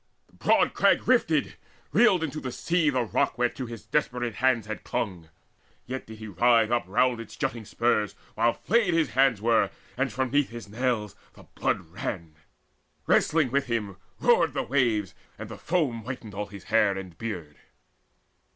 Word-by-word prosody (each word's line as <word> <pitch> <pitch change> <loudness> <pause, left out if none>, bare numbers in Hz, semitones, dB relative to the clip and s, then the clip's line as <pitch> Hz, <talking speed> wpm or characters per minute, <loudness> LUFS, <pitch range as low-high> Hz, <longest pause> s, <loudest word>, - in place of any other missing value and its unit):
The - - -32
broad - - +2
crag - - +3
rifted - - +2 0.3
reeled 190 -8 +4
into 155 -1 -3
the 130 - -5
sea, 170 +3 +1
The 130 -3 +1
rock 110 - 0
whereto 125 +1 -1
his 115 -2 -9
desperate 125 -5 -1
hands 125 -2 +1
had 110 0 -6
clung; 95 -10 -3 0.6
Yet 130 +1 -6
did 110 0 -10
he 110 0 -8
writhe 115 +3 +3
up 120 -1 +1
round 120 +4 +2
its 115 - -9
jutting 115 -2 -3
spurs, 110 -2 0 0.2
While 115 +1 +2
flayed 220 -7 +1
his 160 -4 +1
hands 130 -5 +3
were, 115 -1 +3 0.3
and 135 +1 0
from 130 -1 -2
'neath 145 0 +2
his 120 -3 -9
nails 110 -2 -1 0.2
The - - -15
blood - - -2
ran. 85 -1 -6 0.7
Wrestling 155 -6 +3
with 140 0 +1
him 105 -5 -2 0.2
roared 165 - +3
the - - 0
waves, 115 -8 +1 0.2
And - - -8
the - - -8
foam 145 -10 0
whitened 115 -3 -7
all 105 +1 -4
his 100 -2 -11
hair 105 -3 +2
and 95 -3 -8
beard. 90 -10 -6
120 Hz, 170 wpm, -27 LUFS, 105-130 Hz, 0.7 s, reeled